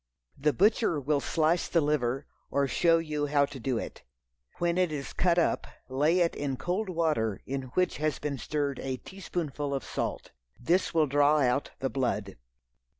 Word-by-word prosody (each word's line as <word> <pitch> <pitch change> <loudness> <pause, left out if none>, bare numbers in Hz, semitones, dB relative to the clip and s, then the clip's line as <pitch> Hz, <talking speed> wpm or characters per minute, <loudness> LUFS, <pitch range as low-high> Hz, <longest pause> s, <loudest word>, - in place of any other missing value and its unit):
THE 150 +2 +2
butcher 205 -2 +3
will 145 +1 +1
slice 160 +4 +1
the 170 - +2
liver, 140 -3 0 0.2
or 140 0 +1
show 165 +4 +4
you 150 -3 -2
how 145 0 +3
to 140 -1 -9
do 125 0 -1
it. - - -6 0.6
When 175 +1 +1
it 180 -3 +2
is 140 -2 -5
cut 175 -1 +2
up, 170 - +1 0.2
lay 150 +7 +2
it 170 - +2
in 140 -2 -2
cold 185 +7 -2
water 155 - 0
in 135 -1 -4
which 180 0 +1
has 155 -2 0
been 140 -3 -3
stirred 145 -2 -2
a 130 -1 -3
teaspoonful 150 -5 -4
of 135 - -3
salt. - - -4 0.3
This 175 +10 +1
will 160 -2 +5
draw 145 +2 +3
out 130 +1 +1
the 135 - 0
blood. 110 -7 -2
145 Hz, 175 wpm, -29 LUFS, 135-170 Hz, 0.6 s, will